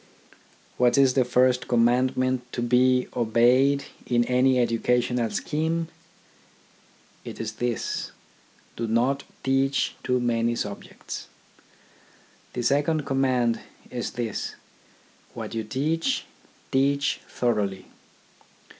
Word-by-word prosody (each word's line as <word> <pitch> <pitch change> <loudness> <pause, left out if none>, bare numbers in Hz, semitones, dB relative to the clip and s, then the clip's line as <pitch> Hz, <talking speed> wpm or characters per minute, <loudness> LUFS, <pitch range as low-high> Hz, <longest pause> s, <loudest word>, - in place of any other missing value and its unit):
What 125 +2 +3
is 135 -2 +5
the 130 - +3
first 125 +1 +2
commandment 125 +1 +1
to 120 - -2
be 125 +1 +3
obeyed 125 +4 +3 0.2
in 120 -1 +3
any 125 +1 +3
educational 120 0 +1
scheme? 160 +5 -1 1.3
It - - -8
is 110 -1 -3
this: 120 -3 -2 0.7
Do 115 - -3
not 125 +5 +1 0.2
teach 135 0 +1
too 125 0 +1
many 120 -1 +1
subjects. 100 -3 -6 1.3
The 125 - -3
second 145 +3 +1
command 130 -4 +1 0.3
is 120 -1 -4
this: 115 -4 -3 0.8
What - - -6
you 115 -1 -2
teach, 155 - -1 0.5
teach 140 +1 +1
thoroughly. 105 -6 -1
125 Hz, 100 wpm, -25 LUFS, 120-135 Hz, 1.3 s, is